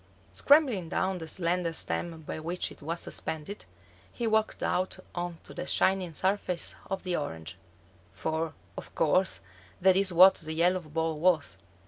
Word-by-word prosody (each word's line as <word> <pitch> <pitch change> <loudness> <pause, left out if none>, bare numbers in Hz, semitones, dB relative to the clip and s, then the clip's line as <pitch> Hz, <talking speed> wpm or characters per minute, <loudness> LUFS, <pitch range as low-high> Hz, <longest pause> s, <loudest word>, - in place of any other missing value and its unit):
Scrambling 260 - +4
down 190 +1 0
the 160 - -7
slender 170 0 0
stem 165 0 -3
by 155 - -5
which 170 +3 -2
it - - -13
was 165 +3 -3
suspended, 160 +6 -4 0.5
he 235 - -4
walked 220 -1 +1
out 185 +1 0 0.2
on 175 -1 -4
to - - -10
the - - -5
shining 185 -4 +2
surface 185 -2 0 0.2
of 195 -1 -3
the 180 -2 -1
orange; 80 - -5 0.5
for, 160 - -3 0.2
of - - -9
course, 185 +4 +2 0.4
that 190 0 +5
is 195 -1 +2
what 185 +3 +8
the 155 -1 -5
yellow 175 +3 +3
ball 160 0 -2
was. 165 -3 +2
175 Hz, 155 wpm, -29 LUFS, 160-190 Hz, 0.5 s, what